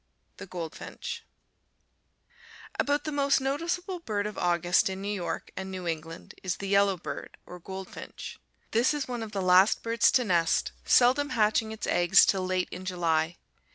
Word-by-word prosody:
THE -, -, -9 dB
GOLDFINCH 170 Hz, -3 st, -6 dB, 1.6 s
About 290 Hz, +1 st, +1 dB
the 305 Hz, -, -3 dB
most 280 Hz, -1 st, +2 dB
noticeable 340 Hz, +7 st, -2 dB
bird 210 Hz, -10 st, -2 dB
of 210 Hz, -1 st, -4 dB
August 175 Hz, +1 st, +2 dB
in 190 Hz, 0 st, -5 dB
New 200 Hz, +1 st, -3 dB
York 185 Hz, -4 st, -4 dB
and 190 Hz, -, -5 dB
New 185 Hz, -2 st, -5 dB
England 165 Hz, 0 st, -5 dB
is 185 Hz, -1 st, -2 dB
the 195 Hz, -, -5 dB
yellowbird, 200 Hz, -3 st, 0 dB
or 180 Hz, -, -10 dB
goldfinch. 190 Hz, +2 st, -8 dB, 0.3 s
This 240 Hz, +6 st, +3 dB
is 290 Hz, -, -3 dB
one 245 Hz, -2 st, -4 dB
of 220 Hz, -1 st, -6 dB
the 195 Hz, -2 st, -2 dB
last 185 Hz, +3 st, +5 dB
birds 230 Hz, +1 st, +3 dB
to 255 Hz, -, +4 dB
nest, 170 Hz, -6 st, +1 dB
seldom 260 Hz, +4 st, +4 dB
hatching 220 Hz, 0 st, +2 dB
its 220 Hz, -, -5 dB
eggs 175 Hz, -1 st, +5 dB
till 190 Hz, -2 st, +1 dB
late 185 Hz, 0 st, -1 dB
in 180 Hz, -, -7 dB
July. 170 Hz, -3 st, 0 dB
195 Hz, 160 wpm, -28 LUFS, 180-240 Hz, 1.6 s, last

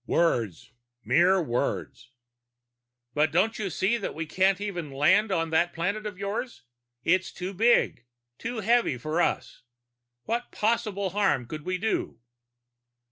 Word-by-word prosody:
"Words. 120 Hz, -, 0 dB, 0.3 s
Mere 185 Hz, +3 st, +4 dB
words." 125 Hz, -1 st, -3 dB, 1.0 s
"But 150 Hz, +1 st, +2 dB
don't 215 Hz, +7 st, +1 dB
you 200 Hz, -2 st, -2 dB
see 190 Hz, +7 st, +1 dB
that 220 Hz, -, -5 dB
we 165 Hz, +1 st, -3 dB
can't 190 Hz, +4 st, +2 dB
even 180 Hz, -7 st, -4 dB
land 185 Hz, +10 st, +3 dB
on 165 Hz, -3 st, 0 dB
that 170 Hz, +2 st, +2 dB
planet 200 Hz, +6 st, -2 dB
of 195 Hz, -3 st, -7 dB
yours! 200 Hz, -, -4 dB, 0.4 s
It's 185 Hz, +1 st, +2 dB
too 185 Hz, +2 st, -5 dB
big, 220 Hz, -, +3 dB, 0.3 s
too 230 Hz, -1 st, -4 dB
heavy 230 Hz, -, +2 dB
for 155 Hz, +7 st, -1 dB
us. -, -, -1 dB, 0.6 s
What 235 Hz, +2 st, -3 dB
possible 210 Hz, -4 st, 0 dB
harm 190 Hz, -11 st, +1 dB
could 150 Hz, +5 st, -7 dB
we 185 Hz, 0 st, -1 dB
do?" 195 Hz, -, -2 dB
185 Hz, 135 wpm, -27 LUFS, 160-210 Hz, 1.0 s, Mere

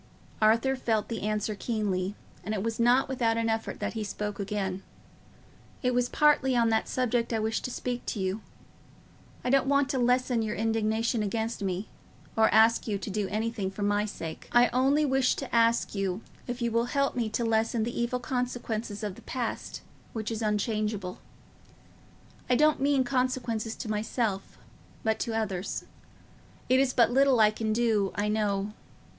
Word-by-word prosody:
Arthur 230 Hz, +5 st, +4 dB
felt 220 Hz, -5 st, -1 dB
the 230 Hz, -, -3 dB
answer 215 Hz, 0 st, -1 dB
keenly, 200 Hz, -3 st, -2 dB, 0.3 s
and 215 Hz, -, -2 dB
it 195 Hz, -, -2 dB
was 225 Hz, 0 st, -2 dB
not 245 Hz, +3 st, +4 dB
without 235 Hz, -4 st, +1 dB
an 230 Hz, 0 st, +1 dB
effort 225 Hz, 0 st, -2 dB
that -, -, -2 dB
he 220 Hz, -2 st, -3 dB
spoke 210 Hz, 0 st, -4 dB
again. 195 Hz, -2 st, -2 dB, 1.0 s
"It 250 Hz, 0 st, +2 dB
was 245 Hz, 0 st, +1 dB
partly 290 Hz, -3 st, +3 dB
on 235 Hz, -1 st, +3 dB
that 220 Hz, 0 st, +1 dB
subject 245 Hz, -2 st, 0 dB
I 225 Hz, -, +1 dB
wished 220 Hz, +1 st, -1 dB
to -, -, -2 dB
speak 245 Hz, 0 st, -3 dB
to 215 Hz, -, -2 dB
you. 190 Hz, +3 st, -1 dB, 1.0 s
I 250 Hz, -, 0 dB
don't 275 Hz, 0 st, +3 dB
want 280 Hz, 0 st, +3 dB
to 270 Hz, -3 st, 0 dB
lessen 245 Hz, -1 st, +2 dB
your 215 Hz, -1 st, -2 dB
indignation 225 Hz, +1 st, 0 dB
against 220 Hz, +2 st, -2 dB
me, 190 Hz, +1 st, -2 dB, 0.5 s
or 220 Hz, 0 st, +5 dB
ask 225 Hz, +3 st, +5 dB
you 205 Hz, -2 st, 0 dB
to 195 Hz, +1 st, -6 dB
do 205 Hz, 0 st, -1 dB
anything 215 Hz, -1 st, -2 dB
for 195 Hz, +2 st, -5 dB
my 205 Hz, +1 st, +2 dB
sake. 165 Hz, -6 st, -7 dB
I 240 Hz, 0 st, +5 dB
only 270 Hz, +5 st, +3 dB
wish 265 Hz, -2 st, +2 dB
to 270 Hz, -3 st, -4 dB
ask 230 Hz, 0 st, +3 dB
you 195 Hz, 0 st, -2 dB, 0.2 s
if 245 Hz, 0 st, -3 dB
you 235 Hz, -, 0 dB
will 230 Hz, +1 st, +2 dB
help 275 Hz, +2 st, 0 dB
me 235 Hz, -3 st, 0 dB
to 225 Hz, +2 st, -1 dB
lessen 225 Hz, 0 st, +1 dB
the 235 Hz, +1 st, -2 dB
evil 245 Hz, +1 st, -1 dB
consequences 240 Hz, -4 st, -3 dB
of 205 Hz, -2 st, -2 dB
the -, -, -14 dB
past, 245 Hz, -4 st, -4 dB, 0.3 s
which 220 Hz, -1 st, -3 dB
is 225 Hz, 0 st, -3 dB
unchangeable. 210 Hz, -2 st, -1 dB, 1.3 s
I 250 Hz, -, +4 dB
don't 305 Hz, +1 st, +3 dB
mean 280 Hz, -1 st, +3 dB
consequences 245 Hz, -3 st, -1 dB
to -, -, -6 dB
myself, 210 Hz, -1 st, -2 dB, 0.5 s
but 220 Hz, 0 st, +1 dB
to 225 Hz, -1 st, -1 dB
others. 195 Hz, -4 st, -3 dB, 0.8 s
It 255 Hz, +1 st, +5 dB
is 270 Hz, -1 st, +3 dB
but 235 Hz, -2 st, +4 dB
little 270 Hz, -1 st, +4 dB
I 215 Hz, -1 st, +6 dB
can 220 Hz, 0 st, -2 dB
do, 215 Hz, -4 st, +2 dB
I 205 Hz, +1 st, 0 dB
know. 210 Hz, -1 st, 0 dB
225 Hz, 175 wpm, -28 LUFS, 210-245 Hz, 1.3 s, I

